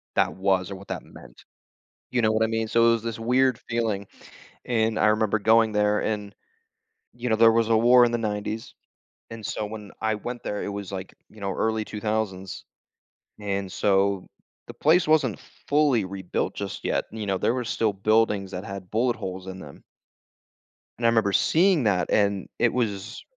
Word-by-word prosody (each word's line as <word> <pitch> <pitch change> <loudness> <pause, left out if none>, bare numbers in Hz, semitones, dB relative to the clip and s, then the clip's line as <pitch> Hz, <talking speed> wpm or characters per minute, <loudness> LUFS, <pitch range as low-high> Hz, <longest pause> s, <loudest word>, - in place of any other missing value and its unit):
that - - +2
was 95 -1 0
or - - -4
what 100 +1 -12
that - - -4
meant, - - -15 0.7
you 125 - +1
know 110 -1 +3
what 110 +1 +2
I - - +2
mean? 115 0 -1
So, 115 +1 +4
it - - +6
was 115 -1 -2
this 115 -1 -4
weird 125 +2 +2
feeling, 110 -4 -1 0.6
and 110 -2 0
I - - +4
remember 110 0 +2
going 110 +1 +4
there, 105 0 +2
and, 105 -2 -3 0.8
you 120 +1 -4
know, 110 - +3
there 115 0 +7
was 115 0 +2
a 115 - +4
war 120 +2 +6
in 120 - 0
the 120 - 0
90's, 110 0 -4 0.6
and 115 -1 -8
so - - -3
when 105 -1 -9
I 110 0 +1
went 120 +3 -6
there, 105 - -3
it - - -4
was, 100 -2 -5
like, 95 -1 -6 0.2
you 110 - -16
know, 100 -1 -2
early 110 +1 0
2000's, 105 -3 -3 0.8
and 100 -2 -3
so, 100 0 +1 0.4
the - - -10
place 165 +4 +3
wasn't 150 -8 +3 0.3
fully 145 -7 +3
rebuilt 95 -1 -3
just - - -6
yet, - - 0
you 110 -1 -5
know, 95 -1 0
there 115 - +1
were 125 -1 -2
still 110 -1 0
buildings 105 -1 +1
that 90 +2 -5
had 95 -3 -8
bullet 120 +3 +1
holes 95 -4 -6
in 95 0 -7
them. 70 -5 -12 1.2
And 115 - +1
I - - +6
remember 110 -3 +2
seeing 170 - +3
that, 90 -5 +1
and 100 -2 +1
it 120 - +3
was, 110 -2 -3
110 Hz, 190 wpm, -25 LUFS, 100-115 Hz, 1.2 s, there